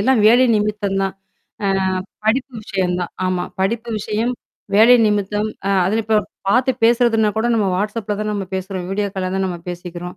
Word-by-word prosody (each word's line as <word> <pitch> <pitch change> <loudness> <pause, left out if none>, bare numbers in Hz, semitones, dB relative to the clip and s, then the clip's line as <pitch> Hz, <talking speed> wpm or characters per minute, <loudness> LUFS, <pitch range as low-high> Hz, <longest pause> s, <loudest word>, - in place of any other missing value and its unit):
எல்லாம் 235 +1 +3
வேலை 240 +4 +6
நிமித்தம் 205 -2 -1
தான். 195 -1 -2 0.5
அ - - +2 0.6
படிப்பு 255 +4 +1
விஷயம் 185 -3 -1
தான், 175 - -4
ஆமா. 180 -1 -1 0.2
படிப்பு 230 +5 -1
விஷயம், 220 +4 -1 0.4
வேலை 225 +4 +7
நிமித்தம், 210 0 0 0.2
அ - - +2 0.2
அதில 220 +4 +1
இப்ப 215 0 +3 0.3
பார்த்து 250 +5 +3
பேசுறதுனா 230 -2 +3
கூட 220 +2 +1
நம்ம 215 -3 +1
Whatsappல 210 +1 -2
தான் 215 0 -2
நம்ம 200 -2 -3
பேசுறோம், 190 -1 -4
வீடியோ 200 +1 -1
கால்ல 185 -1 -2
தான் 190 0 0
நம்ம 180 -2 -4
பேசிக்கிறோம். 175 0 -7
210 Hz, 170 wpm, -19 LUFS, 190-225 Hz, 0.6 s, வேலை